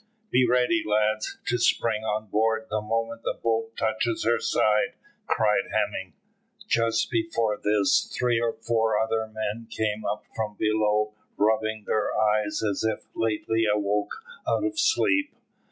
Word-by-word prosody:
"Be 125 0 +4
ready, 125 +7 +3
lads, 110 +1 0
to 120 - 0
spring 110 -2 +1
on 110 0 -1
board 110 +2 +1
the 110 0 0
moment 115 +1 -2
the - - -2
boat 115 0 -2
touches 110 +1 0
her 120 +1 +3
side," 105 0 +2 0.3
cried - - +2
Hemming. - - -1 0.5
Just 115 -1 +1
before 330 - 0
this 105 -1 +2
three 120 -2 +2
or 115 -1 0
four 115 -1 0
other 110 0 0
men 110 +1 -4
came 110 -1 -2
up 105 - -2
from 110 -2 -3
below 105 0 +1 0.2
rubbing 110 0 +1
their 110 - 0
eyes 105 -1 +1
as 100 0 -1
if 110 0 -1
lately 110 0 0
awoke 105 - -1 0.2
out - - +1
of 330 0 -1
sleep. 300 -8 +2
110 Hz, 145 wpm, -26 LUFS, 105-115 Hz, 0.5 s, Be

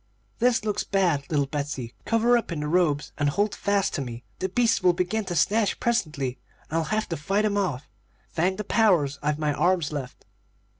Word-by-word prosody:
"'This 240 -2 +2
looks 210 -1 0
bad, 175 -8 +1
little 145 -3 +1
Betsey. 140 -4 -4
Cover 230 +2 +3
up 235 -6 -1
in 155 -3 -3
the 150 - -2
robes, 155 -3 +1
and 145 0 +2
hold 205 +7 0
fast 200 -1 0
to 145 - -1
me. 120 -2 -6 0.2
The 190 - -1
beasts 230 +2 +2
will 180 -1 +4
begin 185 +5 -1
to 180 -2 -3
snatch 205 +6 +2
presently, 150 - -1 0.3
and 165 - +1
I'll - - 0
have 215 +3 -1
to 165 - -1
fight 195 +8 0
'em 205 -1 +1
off. 165 -10 -1 0.4
Thank 185 +3 0
the 210 - -3
powers, 180 -11 +2
I've 150 0 0
my 150 -1 0
arms 170 +2 +1
left.' 135 -4 -6
175 Hz, 200 wpm, -26 LUFS, 145-205 Hz, 0.4 s, will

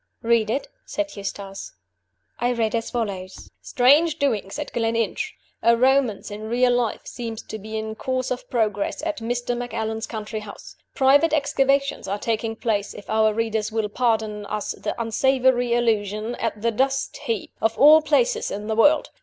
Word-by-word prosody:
"Read 230 -2 +2
it," 270 +5 -1 0.2
said 305 -1 -4
Eustace. 195 -1 -6 0.7
I 245 - +1
read 225 -3 0
as 230 -1 -1
follows: 195 -6 -5
"STRANGE 295 +6 +4
DOINGS 225 -9 -1
AT 295 - -5
GLENINCH 230 -1 -1 0.3
A 235 0 +4
romance 255 -5 +2
in 215 +1 -6
real 245 +1 +3
life 245 -2 -1
seems 230 -3 -6
to 220 - -7
be 220 +2 -6
in 220 0 -4
course 255 +3 -2
of 255 - -4
progress 215 0 -1
at 315 -1 -2
Mr. 245 +1 -2
Macallan's 225 -2 -3
country 215 -1 -5
house. 210 -1 -11 0.2
Private 285 +4 +4
excavations 275 -1 +1
are 200 +2 -1
taking 225 +1 -2
place 210 -3 -1
if 205 - -9
our 220 0 +4
readers 220 -1 -1
will 220 -1 -1
pardon 220 -3 0
us 210 -1 -3
the - - -5
unsavory 245 +1 +2
allusion 215 -1 0
at 230 -2 -2
the 230 - +2
dust 270 +4 0
heap, 225 -4 -3
of 225 0 +1
all 305 +2 +8
places 455 +10 +1
in 205 +1 -5
the 220 0 -1
world! 295 +7 +4
230 Hz, 165 wpm, -23 LUFS, 215-260 Hz, 0.7 s, all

